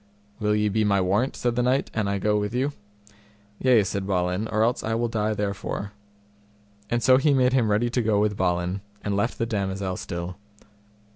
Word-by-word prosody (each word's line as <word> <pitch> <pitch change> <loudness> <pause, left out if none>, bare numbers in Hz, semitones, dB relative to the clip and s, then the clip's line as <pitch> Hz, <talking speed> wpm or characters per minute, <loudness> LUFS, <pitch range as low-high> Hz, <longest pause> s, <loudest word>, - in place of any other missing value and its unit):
Will 105 -1 +1
ye 105 0 +2
be 110 +2 +1
my 100 -1 +3
warrant, 100 +8 +1
said 120 -1 -1
the 125 - +1
knight, 130 +3 +1
an 110 -2 -1
I 100 0 0
go 105 +2 +1
with 105 +3 -3
you? 135 +3 0 0.9
Yea, 125 -5 +4
said 100 0 -3
Balin, 90 +2 0
or 110 0 +1
else 120 +2 +1
I 115 +1 -1
will 120 +1 0
die 110 -1 -1
therefore. 100 0 -3 1.0
And 120 0 0
so 130 -1 +6
he 140 +1 +3
made 130 -1 +3
him 120 -5 +2
ready 115 +3 +1
to 125 - +1
go 110 -2 +2
with 105 0 +1
Balin, 90 0 -1 0.2
and 100 -1 -1
left 100 +4 0
the 115 - 0
damosel 95 -4 -2
still. 85 +1 -5
105 Hz, 200 wpm, -25 LUFS, 100-120 Hz, 1.0 s, so